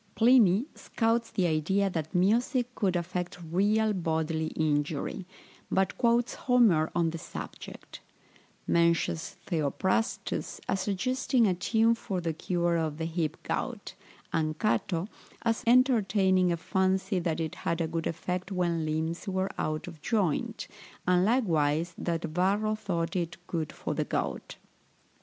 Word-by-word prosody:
Pliny 230 Hz, -3 st, +5 dB
scouts 230 Hz, 0 st, 0 dB
the 185 Hz, -, 0 dB
idea 175 Hz, +5 st, +1 dB
that 160 Hz, -4 st, -4 dB
music 240 Hz, +6 st, +2 dB
could 190 Hz, -6 st, 0 dB
affect 180 Hz, +1 st, -3 dB
real 205 Hz, +6 st, +1 dB
bodily 160 Hz, -3 st, -1 dB
injury, 150 Hz, +3 st, -1 dB, 0.4 s
but 190 Hz, 0 st, +1 dB
quotes 235 Hz, 0 st, +2 dB
Homer 220 Hz, -12 st, +3 dB
on 170 Hz, -1 st, +2 dB
the 165 Hz, -, -6 dB
subject; -, -, -9 dB, 0.7 s
mentions 170 Hz, +1 st, +1 dB
Theophrastus 175 Hz, +7 st, -1 dB
as 190 Hz, -, 0 dB
suggesting 240 Hz, +5 st, +1 dB
a 190 Hz, -, +3 dB
tune 225 Hz, +5 st, +2 dB
for 195 Hz, -5 st, -3 dB
the 165 Hz, -2 st, -2 dB
cure 175 Hz, +1 st, 0 dB
of 155 Hz, -2 st, -2 dB
the 160 Hz, -, -2 dB
hip 165 Hz, -2 st, -2 dB
gout, -, -, -3 dB, 0.4 s
and 155 Hz, -1 st, 0 dB
Cato 185 Hz, -3 st, 0 dB, 0.4 s
as 230 Hz, -1 st, 0 dB
entertaining 200 Hz, -7 st, +4 dB
a 170 Hz, -, 0 dB
fancy 190 Hz, +2 st, 0 dB
that 165 Hz, -2 st, -1 dB
it 160 Hz, -1 st, -2 dB
had 165 Hz, -, -2 dB
a 165 Hz, -, +1 dB
good 165 Hz, 0 st, -2 dB
effect 180 Hz, +3 st, -3 dB
when 175 Hz, -3 st, 0 dB
limbs 160 Hz, +4 st, -2 dB
were 190 Hz, 0 st, -1 dB
out 155 Hz, +2 st, -2 dB
of 165 Hz, -4 st, -10 dB
joint, 220 Hz, -, -1 dB, 0.4 s
and 180 Hz, 0 st, +4 dB
likewise 170 Hz, -, +1 dB
that 170 Hz, -1 st, -2 dB
Varro 190 Hz, +6 st, +1 dB
thought 170 Hz, -6 st, -2 dB
it 175 Hz, -1 st, -2 dB
good 160 Hz, -4 st, -3 dB
for -, -, -4 dB
the -, -, -1 dB
gout. -, -, -3 dB
180 Hz, 140 wpm, -29 LUFS, 165-210 Hz, 0.7 s, Pliny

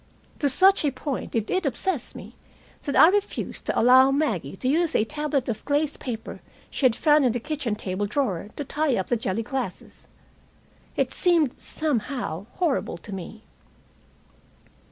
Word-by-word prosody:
To 285 Hz, -, +2 dB
such 385 Hz, +8 st, +5 dB
a 295 Hz, -, +3 dB
point 270 Hz, 0 st, -4 dB
did 220 Hz, -2 st, -1 dB
it 375 Hz, 0 st, +1 dB
obsess 330 Hz, +7 st, -2 dB
me -, -, -10 dB, 0.5 s
that 280 Hz, -, -2 dB
I 325 Hz, -, +8 dB
refused 405 Hz, +1 st, -2 dB
to -, -, +1 dB
allow 255 Hz, +3 st, +7 dB
Maggie 225 Hz, -, -1 dB
to 255 Hz, -, -3 dB
use 325 Hz, +4 st, +2 dB
a -, -, +4 dB
tablet 295 Hz, +1 st, -2 dB
of 220 Hz, -3 st, -3 dB
glazed 295 Hz, +1 st, 0 dB
paper 230 Hz, -4 st, -6 dB, 0.3 s
she 265 Hz, -, +3 dB
had 235 Hz, -, 0 dB
found 300 Hz, +2 st, +4 dB
in 250 Hz, -3 st, +3 dB
the 245 Hz, -, -1 dB
kitchen 275 Hz, -4 st, -3 dB
table 205 Hz, -1 st, -3 dB
drawer 205 Hz, -6 st, -1 dB
to 290 Hz, -, -4 dB
tie 295 Hz, -1 st, 0 dB
up 190 Hz, -, -2 dB
the 240 Hz, -, +3 dB
jelly 220 Hz, -1 st, -2 dB
glasses. 250 Hz, -6 st, -6 dB, 0.9 s
It -, -, 0 dB
seemed, 335 Hz, -8 st, +2 dB
somehow, 245 Hz, -, -3 dB
horrible 315 Hz, -, 0 dB
to 200 Hz, +4 st, -10 dB
me. 195 Hz, +4 st, -8 dB
265 Hz, 165 wpm, -25 LUFS, 220-300 Hz, 0.9 s, I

